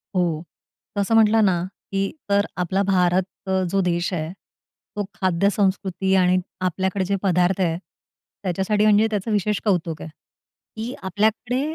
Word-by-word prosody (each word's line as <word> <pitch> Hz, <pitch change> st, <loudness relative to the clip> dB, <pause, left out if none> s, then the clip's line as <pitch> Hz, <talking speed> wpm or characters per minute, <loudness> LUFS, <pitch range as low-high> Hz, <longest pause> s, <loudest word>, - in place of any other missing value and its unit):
हो. 170 Hz, -3 st, +1 dB, 0.5 s
तर 200 Hz, -, +1 dB
असं 215 Hz, +3 st, +1 dB
म्हटलं 220 Hz, 0 st, +5 dB
ना, 175 Hz, -3 st, +2 dB, 0.3 s
की 195 Hz, 0 st, 0 dB, 0.2 s
तर 200 Hz, 0 st, +3 dB
आपला 185 Hz, +2 st, 0 dB
भारत 185 Hz, -1 st, +3 dB, 0.2 s
अ, 190 Hz, 0 st, +1 dB
जो 195 Hz, +1 st, +1 dB
देश 175 Hz, 0 st, 0 dB
आहे, 160 Hz, -2 st, -2 dB, 0.6 s
तो 205 Hz, -, -1 dB
खाद्यसंस्कृती 190 Hz, +1 st, +1 dB
आणि 185 Hz, -1 st, +4 dB, 0.2 s
आपल्याकडे 190 Hz, +1 st, 0 dB
जे 200 Hz, -, 0 dB
पदार्थ 180 Hz, 0 st, +2 dB
आहेत, 170 Hz, -2 st, +1 dB, 0.6 s
त्याच्यासाठी 190 Hz, +3 st, +1 dB
म्हणजे 215 Hz, +1 st, +5 dB
त्याचं 210 Hz, +1 st, -2 dB
विशेष 210 Hz, 0 st, +1 dB
कौतुक 170 Hz, -5 st, 0 dB
आहे -, -, -7 dB, 0.7 s
की 225 Hz, +3 st, -4 dB
आपल्याकडे 220 Hz, +6 st, 0 dB
190 Hz, 145 wpm, -23 LUFS, 180-205 Hz, 0.7 s, म्हटलं